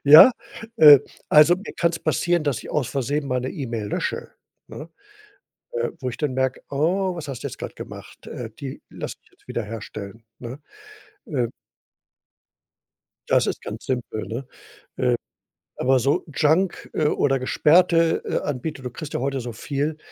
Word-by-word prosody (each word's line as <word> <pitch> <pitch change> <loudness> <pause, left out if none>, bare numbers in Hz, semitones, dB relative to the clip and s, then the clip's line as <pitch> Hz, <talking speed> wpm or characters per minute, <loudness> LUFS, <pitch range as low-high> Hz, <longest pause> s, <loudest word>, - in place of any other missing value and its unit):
ja? 155 - +10 0.5
Ähm, 145 -3 +10 0.3
also, 150 +4 +7
mir 200 - -8
kann 170 -1 +3
es 165 - -5
passieren, 170 +1 +1
dass 145 -5 0
ich - - -9
aus 140 -5 0
Versehen 140 +2 -1
mal 125 -1 0
'ne 130 - -3
E-Mail 115 -6 -4
lösche, - - -3 0.4
ne? 150 - -9 0.9
Äh, 475 0 -1
wo 130 - -2
ich 120 - -7
dann 150 -4 -1
merke: 130 0 0
„Oh, 175 +6 +1
was 165 - -6
hast 135 -4 -6
du - - -1
jetzt - - -9
grad - - -6
gemacht? - - -10
Äh, 120 -2 -6
die 135 -2 -6
lass - - -6
ich - - -28
jetzt - - -30
wiederherstellen“, 110 -1 -6 0.2
ne, 125 +4 -7 0.7
ähm. 125 -6 -1 1.8
Das - - +4
ist - - -2
ganz - - -7
simpel, 120 -4 -3
ne? 120 +4 -5 0.5
Ähm, 125 -1 +2 0.6
aber 130 +1 +3
so 140 +8 +1
Junk, 165 +5 +1
äh, 155 - +1
oder 135 -2 +2
gesperrte, 165 +5 +4
äh, - - 0
Anbieter, 145 0 -4
du 125 - -5
kriegst 150 +4 -8
ja - - -1
heute 135 0 -1
so 120 0 -5
viel, 145 +6 -3
140 Hz, 165 wpm, -23 LUFS, 125-155 Hz, 1.8 s, ja